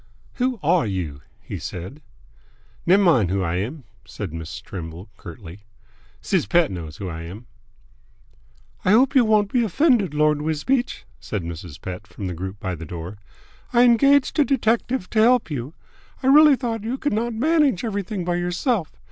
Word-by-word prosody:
"Who 250 -2 0
are 165 -3 +3
you?" 85 -8 -4 0.2
he - - -6
said. 95 - -7 0.9
"Nev' 190 +4 +6
min' 130 - +4
who 95 +1 0
I 85 0 -1
am!" 130 - -4 0.2
said - - -7
Miss 80 -1 -6
Trimble 85 +2 -8
curtly. 85 0 -11 0.6
"Siz 185 -6 0
Pett 170 -3 +3
knows 85 -4 -7
who 100 -3 -5
I 80 -2 -6
am." 95 +8 -9 1.4
"I 185 - +4
hope 255 +4 +4
you 260 - +6
won't 215 -2 +2
be 245 -2 +3
offended, 225 - +2
Lord 150 0 +2
Wisbeach," 160 - -1
said 105 -5 -4
Mrs. 85 -2 -8
Pett 95 +3 -7
from 95 +2 -8
the 90 - -3
group 95 +4 -6
by 95 -2 -3
the 85 -2 -7
door. 85 +5 -7 0.5
"I 240 0 +6
engaged 275 +5 +4
a - - +7
detective 240 -4 0
to 220 - +1
help 240 -4 +4
you. 135 +2 -5 0.5
I - - 0
really 300 -1 +8
thought 235 -4 -3
you 240 +4 -2
could 290 -3 -1
not 230 +2 -1
manage 295 - +2
everything 200 -3 -3
by 175 0 0
yourself. 180 - -1
170 Hz, 170 wpm, -22 LUFS, -, 1.4 s, really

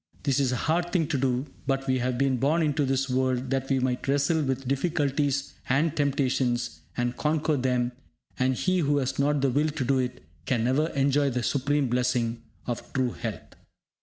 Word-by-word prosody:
This 140 -2 +2
is 135 -2 +2
a - - 0
hard 170 +2 +1
thing 170 -4 +2
to 140 - +1
do, 130 0 0 0.2
but 135 -1 0
we 130 -1 +1
have 125 0 -1
been 135 -1 +2
born 150 +7 +2
into 145 -1 +1
this 135 0 +1
world 130 0 0
that 135 0 -1
we 135 - +3
might 125 0 -1
wrestle 145 +4 +2
with 135 -2 -2
difficulties 140 -1 0 0.2
and 150 +5 +2
temptations, 130 -4 0 0.2
and 120 0 0
conquer 155 +2 +1
them; 125 -2 0 0.5
and 130 0 +2
he 185 +6 +1
who 145 -3 +2
has 135 -1 -1
not 145 0 +2
the 135 -1 +2
will 150 +4 +2
to 145 -3 -3
do 135 +1 +2
it 125 -1 -3 0.2
can 120 -4 +1
never 135 +6 +2
enjoy 140 +1 +3
the 125 -1 -2
supreme 140 +2 +1
blessing 120 -1 0 0.2
of 120 -2 -5
true 130 -2 +1
health. 115 -3 -6
135 Hz, 195 wpm, -27 LUFS, 125-145 Hz, 0.5 s, we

